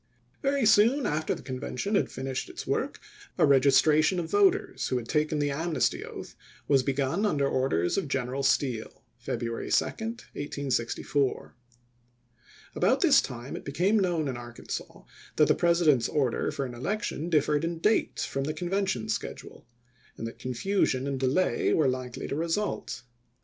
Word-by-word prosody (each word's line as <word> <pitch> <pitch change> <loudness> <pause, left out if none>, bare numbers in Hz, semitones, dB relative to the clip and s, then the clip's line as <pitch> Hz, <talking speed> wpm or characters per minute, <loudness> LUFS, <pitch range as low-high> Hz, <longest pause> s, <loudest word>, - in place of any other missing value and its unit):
^ - - -38
Very 275 -3 +1
soon 225 +6 +5
after 155 +1 0
the - - -11
Convention 130 - -4
had - - +2
finished 130 0 -4
its - - -7
work, - - -2 0.4
a - - +5
registration 150 +5 +4
of 165 -1 -4
voters 205 -1 +2
who 130 - 0
had 115 -2 -5
taken 155 +2 +1
the 145 -1 0
amnesty 155 -1 0
oath - - -9 0.3
was 140 -2 +4
begun 140 +8 -1
under 145 -10 +2
orders 130 - +1
of 180 - -4
G 135 - 0
eneral 130 +2 -3
Steele 125 -7 0 0.2
(February 115 -1 -4
2, - - +3
1864). 145 - -3 1.2
About - - +2
this - - +6
time 125 +2 -7
it - - -7
be 140 - -6
came 190 +9 +2
known 175 -6 0
in 130 -3 -3
Arkansas 120 0 -7 0.3
that - - +4
the - - +5
President's 170 -8 +3
order 135 -6 0
for 140 - -3
an 125 - -7
election 170 - -3
differed 150 -2 +2
in 165 0 -2
date 210 +7 +1
from 135 0 -2
the 155 - -3
Convention 180 - -1
schedule; 110 - -5 0.5
and - - -5
that 115 - -7
confusion 130 +1 0
and 140 -1 -2
delay 135 +8 +1
were 155 -4 +3
likely 130 -1 -3
to - - -4
result. 165 -4 -2
145 Hz, 160 wpm, -28 LUFS, 130-175 Hz, 1.2 s, this